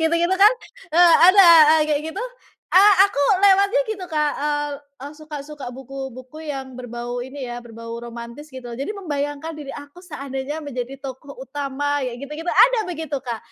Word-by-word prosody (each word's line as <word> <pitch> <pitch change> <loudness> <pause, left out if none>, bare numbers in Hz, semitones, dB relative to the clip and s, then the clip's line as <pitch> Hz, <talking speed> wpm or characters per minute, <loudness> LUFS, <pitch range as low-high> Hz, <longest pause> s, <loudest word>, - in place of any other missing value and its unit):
gitu-gitu 335 +3 +1
kan, 400 +4 +6 0.4
eee, 345 -1 +7
ada, 390 0 +7 0.3
eee, 310 - +3
kayak 290 - +1
gitu. 400 +9 -5 0.4
Eee, 400 +2 +6
aku 285 -8 -4 0.2
lewatnya 400 +4 +4
gitu, 395 -4 -4
Kak, 300 -1 +1
eee, 295 0 -1 0.4
eh, 290 - -9
suka 305 -1 -9
suka 285 -5 -8
buku 265 +1 -8
buku 260 +6 -9
yang 265 -2 -6
berbau 245 0 -6
ini 265 0 -7
ya, 240 0 -7
berbau 230 0 -9
romantis, 235 +5 -9
gitu. 245 -3 -8
Jadi 275 - -4
membayangkan 305 -5 -4
diri 295 -3 -8
aku 290 +6 -11
seandainya 280 -3 -6
menjadi 270 -3 -6
tokoh 275 0 -9
utama, 285 +1 -3
kayak 245 -1 -4
gitu-gitu, 315 +4 -5
ada - - +5
begitu 320 -4 -4
Kak. 235 -4 -4
285 Hz, 170 wpm, -21 LUFS, 260-320 Hz, 0.4 s, eee